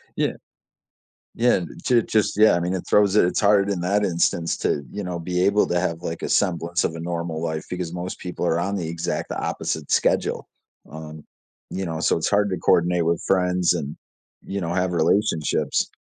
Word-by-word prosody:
Yeah, - - 0 1.0
yeah, 120 -4 +3 0.2
j 120 -2 +4
just, 110 -2 0
yeah, 110 +1 +6
I - - +1
mean, 90 +2 -1
it 95 - -3
throws 105 -1 +4
it 105 - +6
it's 90 - 0
hard 100 -1 +4
in 100 -3 -1
that 100 +4 +1
instance 85 -2 0
to, 70 - -1
you 105 - -5
know, 90 -2 -4
be 90 +1 -2
able 100 +1 +3
to 90 - +1
have, 85 -2 -2
like, 80 - -5
a - - -3
semblance 90 -2 +1
of 80 - -1
a 80 - -6
normal 85 -1 -3
life 80 -1 -3
because 90 -2 -4
most 90 +1 -5
people 90 -1 -4
are 85 -1 +1
on 95 +3 -1
the 90 -5 -3
exact 85 +1 -3
opposite 80 -3 -3
schedule, - - +1 0.4
um, 80 0 -9 0.5
you 95 0 -3
know, 80 -1 -4
so - - +2
it's 80 - -1
hard 105 0 +2
to 95 - -2
coordinate 85 -1 +2
with 85 0 +1
friends 90 -2 +2
and, 70 +2 -4 0.5
you 100 0 -5
know, 85 -1 -2
have 90 0 0
relationships. 85 0 +1
90 Hz, 200 wpm, -23 LUFS, 85-100 Hz, 1.0 s, yeah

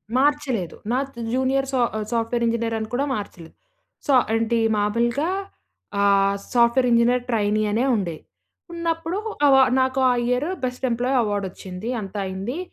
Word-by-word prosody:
మార్చలేదు. 265 - +1 0.2
నా 255 - +2
తు 235 - -11
జూనియర్ 265 +1 +1
సా 260 - 0 0.2
ఆహ్, 215 - -3
సాఫ్ట్‌వేర్ 235 +1 0
ఇంజనీర్ 230 0 -1
అని 220 - -4
కూడా 275 +3 +1
మార్చలేదు. 175 -5 -8 0.5
సో, 280 - +3 0.2
ఏంటి 230 +1 +1 0.2
మామూలుగా 235 +9 0 0.7
ఆహ్, 200 0 +3 0.2
సాఫ్ట్‌వేర్ 240 +1 +4
ఇంజనీర్ 240 +1 +3
ట్రైనీ 215 -1 +1
అనే 230 +4 +1
ఉండే. 175 -6 -2 0.6
ఉన్నప్పుడు 335 +1 -2 0.3
అ - - +7
వ - - +7 0.2
నాకు 260 +1 0
ఆ - - +3
ఇయర్ 250 +5 0 0.2
బెస్ట్ 250 +1 -2
ఎంప్లాయీ 250 +3 0
అవార్డొచ్చింది. 200 0 -4
అంత 195 0 -9
అయింది. 195 - -4
235 Hz, 145 wpm, -23 LUFS, 205-260 Hz, 0.7 s, అ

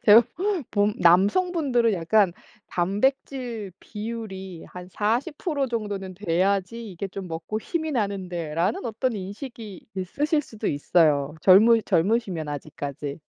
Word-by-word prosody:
제가 225 +1 +9 0.5
본 205 0 +2
남성분들은 240 - +3
약간 190 +2 +3 0.3
'단백질 225 +2 -1
비율이 205 -5 -6
한 180 0 -9
40% 275 - -1
정도는 205 -6 -4
돼야지 195 +4 0
이게 190 +2 -5
좀 190 0 -7
먹고 165 +6 -4
힘이 315 +4 -2
나는데.'라는 185 - -1
어떤 235 +2 -1
인식이 205 +1 -8
있으실 295 - 0
수도 220 -5 -7
있어요. 145 -1 +2
젊으 220 +6 +7
젊으시면 185 -4 +1
아직까지. 145 -1 -5
200 Hz, 260 characters per minute, -25 LUFS, 180-235 Hz, 0.5 s, 제가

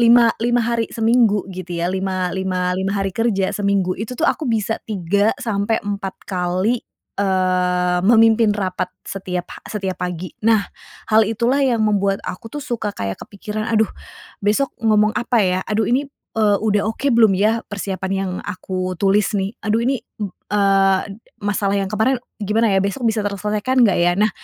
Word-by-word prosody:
lima 235 0 +6
lima 240 0 +2
hari 230 -1 0
seminggu 225 -3 +2
gitu 180 -1 -6
ya, 170 +2 -1
lima 185 -1 -1
lima 185 -1 -1
lima 190 +2 -1
hari 195 -1 -1
kerja 200 -3 0
seminggu, 200 -2 +1
itu 230 +3 -5
tuh 320 - 0
aku 315 -4 +1
bisa 225 -1 -1
3-4 205 0 -1
kali, 185 +5 0 0.4
eee, 180 -2 +1
memimpin 225 +1 +5
rapat 185 -2 -2 0.2
setiap 180 -2 -4
ha - - -11
setiap 195 -3 -3
pagi. 180 -1 -4
Nah 215 -3 +3 0.4
hal 220 +1 +5
itulah 235 +6 +1
yang 250 -4 +2
membuat 200 -2 +1
aku 225 +4 -6
tuh 295 - -5
suka 225 -3 -2
kayak 100 - -4
kepikiran, 210 +1 -6
"Aduh, 220 0 +4 0.6
besok 210 +7 +1
ngomong 215 -1 +3
apa 240 0 +1
ya? 185 0 +1
Aduh 215 0 +1
ini, 270 +5 +1 0.3
eee, 210 -2 +3
udah 210 -2 +1
oke 265 +3 0
belum 225 -2 +6
ya 220 +3 +2
persiapan 190 -2 -4
yang 190 -1 -2
aku 185 -2 -4
tulis 200 +1 +2
nih? 195 +3 -2
Aduh 220 +1 +1
ini, 265 -1 0 0.2
mmm, 205 -3 -3 0.2
eee, 195 -2 +3 0.4
masalah 200 -1 0
yang 195 - -1
kemarin 220 +5 +1 0.2
gimana 215 +2 +2
ya, - - +4
besok 200 +5 -2
bisa 220 -1 +1
terselesaikan 210 +5 +1
nggak 195 - +2
ya?" 175 0 +4
Nah 215 +1 +3
205 Hz, 165 wpm, -20 LUFS, 190-225 Hz, 0.6 s, lima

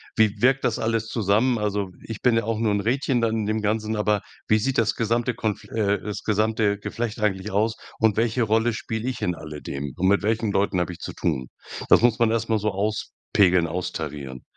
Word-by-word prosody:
Wie 110 -1 +3
wirkt 135 +1 +4
das - - +1
alles 115 0 -1
zusammen? 115 +3 +2
Also, 105 -2 -1
ich 115 -2 -7
bin 125 -2 +4
ja 115 - +1
auch 110 0 -2
nur 110 -2 +1
'n 100 - +1
Rädchen 125 +2 +1
da 115 - +2
in 110 -2 -1
dem 110 0 0
Ganzen, 110 +1 0
aber 105 -1 +1 0.3
wie 110 0 +4
sieht 135 +4 -1
das 115 -1 +2
gesamte 120 +1 0
konf 110 -3 -3
äh, 105 -2 0
das 105 0 -5
gesamte 110 -1 +1
Geflecht 115 +2 -4
eigentlich 100 -1 0
aus 110 +3 +1 0.2
und 110 -2 +2
welche 115 +1 +2
Rolle 110 +2 +2
spiele 110 +2 -3
ich 125 - -5
in 90 - +1
alledem 75 -3 -6
und 95 - +2
mit 100 +1 +4
welchen 110 0 0
Leuten 100 -1 +1
habe 90 0 -1
ich - - -12
zu - - -6
tun?“ 65 -7 -2 0.4
Das - - +7
muss 120 -2 +4
man 115 - +4
erst 115 0 -1
mal 110 -1 +2
so 105 +1 0
auspegeln, 95 -3 +1
austarieren. 75 -6 -5
110 Hz, 215 wpm, -24 LUFS, 100-115 Hz, 0.4 s, Das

